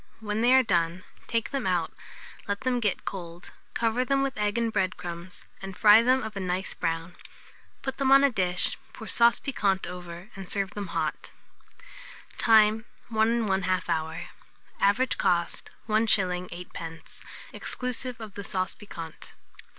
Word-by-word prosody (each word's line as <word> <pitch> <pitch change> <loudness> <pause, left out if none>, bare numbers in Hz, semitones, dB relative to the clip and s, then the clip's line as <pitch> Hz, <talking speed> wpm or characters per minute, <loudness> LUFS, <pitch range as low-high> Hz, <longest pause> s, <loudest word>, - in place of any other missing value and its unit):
When 215 0 -2
they 240 +2 +4
are 260 - +6
done, 175 -4 0 0.2
take 230 -1 -1
them 275 -1 -1
out, - - 0 0.5
let 200 0 -2
them 255 -1 +1
get 210 -5 -1
cold, 175 -2 -7 0.2
cover 230 +2 +1
them 275 +1 +1
with 275 -1 -1
egg 210 +1 0
and 230 -1 0
bread 190 -2 0
crumbs, 175 +1 -7 0.2
and 195 -1 -7
fry 215 +1 +8
them 255 +2 +3
of 220 -1 -6
a - - -3
nice 185 +1 -2
brown. 165 +1 -3 0.7
Put 265 - -3
them 270 -1 +2
on 275 +1 +8
a 280 - +5
dish, 180 -4 0
pour 220 - -9
sauce 235 0 +5
piquante 200 -8 0
over, 175 +3 -8
and 195 -2 -8
serve 195 -1 -1
them 205 -2 -5
hot. 160 -2 -3 1.1
Time. 220 0 +5 0.2
1 225 +1 +2
1/2 185 -1 0
hour. 160 +1 -2 0.5
Average 220 +6 +2
cost, 170 -1 +1 0.2
1s. 195 -5 +2
8d., 165 -2 -9 0.3
exclusive 250 0 -2
of 215 -3 -8
the 200 - -6
sauce 185 -2 -2
piquante. 165 -7 -9
200 Hz, 155 wpm, -27 LUFS, 180-230 Hz, 1.1 s, fry